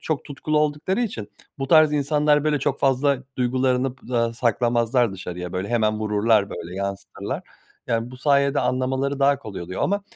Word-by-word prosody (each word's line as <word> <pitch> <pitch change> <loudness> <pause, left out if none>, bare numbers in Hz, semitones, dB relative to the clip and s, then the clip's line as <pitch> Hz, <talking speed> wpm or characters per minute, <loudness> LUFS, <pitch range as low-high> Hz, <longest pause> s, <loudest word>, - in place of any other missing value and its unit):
çok 155 -3 -2
tutkulu 150 +1 -2
oldukları 150 +7 0
için 115 - -4 0.3
bu 135 - -2
tarz 155 -1 +6
insanlar 150 0 +2
böyle 150 -1 +2
çok 135 - -1
fazla 135 +1 +2 0.2
duygularını 125 +1 +1
p 125 -1 -9
aaa, 115 -1 +1
saklamazlar 120 0 +1
dışarıya 90 -2 -6
böyle 95 +2 -3
hemen 110 -3 +1
vururlar 105 -1 +2
böyle 85 +2 -7
yansıtırlar. 100 0 -4 0.4
Yani 115 0 -1
bu 130 - -10
sayede 140 +1 +2
anlamaları 130 +2 -1
daha 140 0 +4
kolay 105 -5 -8
oluyor 90 +2 -5
ama 200 +1 0
130 Hz, 165 wpm, -23 LUFS, 110-145 Hz, 0.4 s, tarz